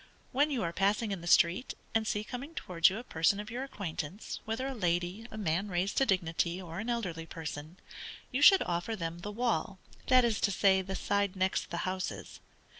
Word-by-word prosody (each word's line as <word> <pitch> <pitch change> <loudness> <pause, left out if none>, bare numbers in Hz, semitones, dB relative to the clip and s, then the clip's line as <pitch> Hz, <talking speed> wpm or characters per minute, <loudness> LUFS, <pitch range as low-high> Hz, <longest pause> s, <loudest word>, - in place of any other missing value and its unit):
When 290 +4 +3
you 260 -7 -1
are 170 0 -2
passing 205 +4 +1
in 190 -3 -3
the 170 - -7
street, 175 +8 +3 0.2
and 225 -1 +1
see 210 -1 0
coming 265 +8 -7
towards 170 -1 +3
you 190 - -4
a 240 - -6
person 165 +1 +1
of 210 +3 -6
your 250 +3 -3
acquaintance, 195 - -5
whether 225 +4 -2
a 270 - -2
lady, 180 +1 -1
a 220 - -8
man 190 0 0
raised 185 +2 -1
to 270 - +4
dignity, 175 -1 0
or 170 -1 -7
an 225 +3 -4
elderly 180 -9 -2
person, 160 +1 -7 0.5
you 265 +2 -1
should 385 +6 +8
offer 175 +6 -2
them 170 -3 -4
the 205 - -6
wall, 210 -5 -1 0.3
that 255 -1 +6
is 225 -3 0
to 200 - +2
say, 190 0 +4
the 190 +1 -5
side 200 -1 0
next 185 0 0
the 170 - -3
houses. 185 0 -4
195 Hz, 205 wpm, -31 LUFS, 175-225 Hz, 0.5 s, should